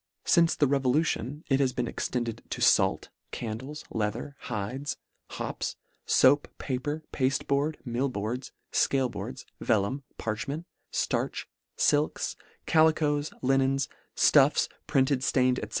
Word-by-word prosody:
Since 170 -1 +4
the 145 - +3
revolution 140 +1 +1
it 135 -2 +2
has 130 -2 +2
been 125 -1 -1
extended 120 -2 -3
to - - -4
fait, - - +3 0.2
candles, 130 +7 -6
leather, 110 +6 -2
hides, 125 +6 -4 0.3
hops, - - -4 0.3
foap, 140 +3 +5
paper, 145 +4 -3
pafte 135 -1 +1
board, 145 +3 +1
mill 125 +3 0
boards, 120 +3 -4 0.2
fcaleboards, 130 -2 0
vellum, 110 +4 +1 0.2
parchment, 140 +9 -3 0.3
ftarch, - - -1 0.3
filks, 150 +1 +1 0.3
calicoes, 155 -2 +3
linens, 135 +1 +2 0.3
fluffs, - - +5 0.2
printed, 135 0 +3
ftained, 130 -1 +2
&c. 105 - -5
135 Hz, 115 wpm, -28 LUFS, 120-145 Hz, 0.3 s, foap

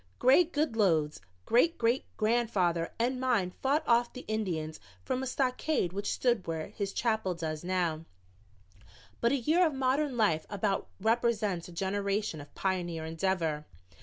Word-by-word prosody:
"Greg 315 +7 +5
Goodloe's 200 - +1 0.2
great 325 +9 +3
great 235 +3 +1
grandfather 215 -7 +1
and 250 +2 0
mine 225 -8 +1
fought 280 +4 +2
off 235 0 +3
the 255 - -9
Indians 175 -8 -2 0.3
from 255 - -1
a 265 - -3
stockade 255 - 0
which 200 +1 -2
stood 240 -6 +1
where 160 -1 -3
his 200 -1 -4
chapel 220 -6 0
does 155 -1 -4
now, 175 -3 -1 1.1
but 235 - +2
a - - +3
year 315 +8 +3
of 315 -5 +1
modern 265 0 +1
life 185 -8 +2
about 200 -1 -1
represents 220 -4 +1
a - - -11
generation 195 -1 -1
of 145 - -14
pioneer 175 -4 -2
endeavor." 165 -2 -1
205 Hz, 145 wpm, -30 LUFS, 175-245 Hz, 1.1 s, Greg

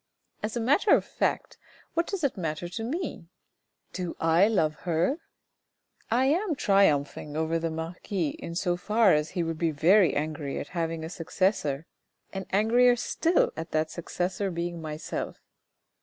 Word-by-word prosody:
As 215 +3 -3
a - - 0
matter 285 - +4
of - - 0
fact, - - -2 0.3
what 335 +1 +1
does 390 -5 -3
it 280 - +1
matter 165 -2 -3
to 225 +6 -5
me? 280 - -4 0.7
Do 180 -2 -4
I 165 +4 +4
love 160 -9 +2
her? 175 - 0 0.9
I 245 +3 +3
am 330 +5 +1
triumphing 150 - +2
over 160 +1 0
the 165 0 -1
marquis 165 +1 -3
in 170 +3 -7
so 175 0 0
far 210 +2 +4
as 150 +1 +1
he 175 - +2
would 165 -1 -3
be 170 - +2
very 170 +6 +4
angry 150 -1 -2
at - - -5
having 165 -2 -2
a - - -4
successor, 165 -4 0 0.5
and 190 -1 -5
angrier 240 +5 +4
still 325 +8 +1
at 165 +1 -5
that 155 0 +1
successor 180 +3 -2
being 170 -1 -3
myself. 155 -1 -5
175 Hz, 155 wpm, -28 LUFS, 160-220 Hz, 0.9 s, matter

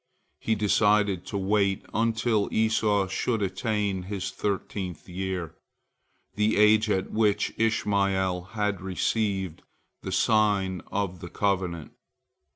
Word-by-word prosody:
He 110 - 0
decided 105 -2 +2
to 100 - -3
wait 100 0 +1
until 115 -1 +1
Esau 110 -2 +2
should 105 +3 -1
attain 100 -1 -1
his 95 0 -4
thirteenth 95 -4 -4
year, 90 -2 -4 0.8
the 105 +1 +1
age 105 +1 +5
at 95 -2 0
which 105 -2 +1
Ishmael 100 -4 +1 0.2
had 105 -3 0
received 95 -1 -1 0.4
the 95 - -5
sign 100 -2 +2
of 95 -3 -2
the 85 - -8
covenant. 90 -6 -1
100 Hz, 110 wpm, -27 LUFS, 95-105 Hz, 0.8 s, age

